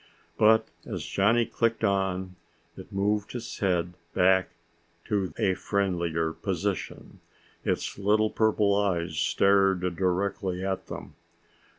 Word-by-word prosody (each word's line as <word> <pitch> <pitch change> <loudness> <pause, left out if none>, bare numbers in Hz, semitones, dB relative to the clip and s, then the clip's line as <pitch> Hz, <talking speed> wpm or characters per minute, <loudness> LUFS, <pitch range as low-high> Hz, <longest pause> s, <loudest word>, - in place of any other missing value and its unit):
But 110 +1 +4 0.2
as - - -5
Johnny 115 +4 +2
clicked 115 0 -1
on, 95 -2 0 0.4
it - - -11
moved 100 +3 -1
its 120 -1 -6
head 90 -3 0 0.2
back 95 0 +4 0.6
to 100 -5 -1
a 95 - +2
friendlier 85 -5 -1
position. - - -4 0.4
Its - - -2
little 105 +2 +2
purple 105 -2 +2
eyes 85 -6 0
stared 95 0 +3
directly 95 0 -1
at 95 -1 -3
them. - - -8
95 Hz, 110 wpm, -27 LUFS, 90-105 Hz, 0.6 s, But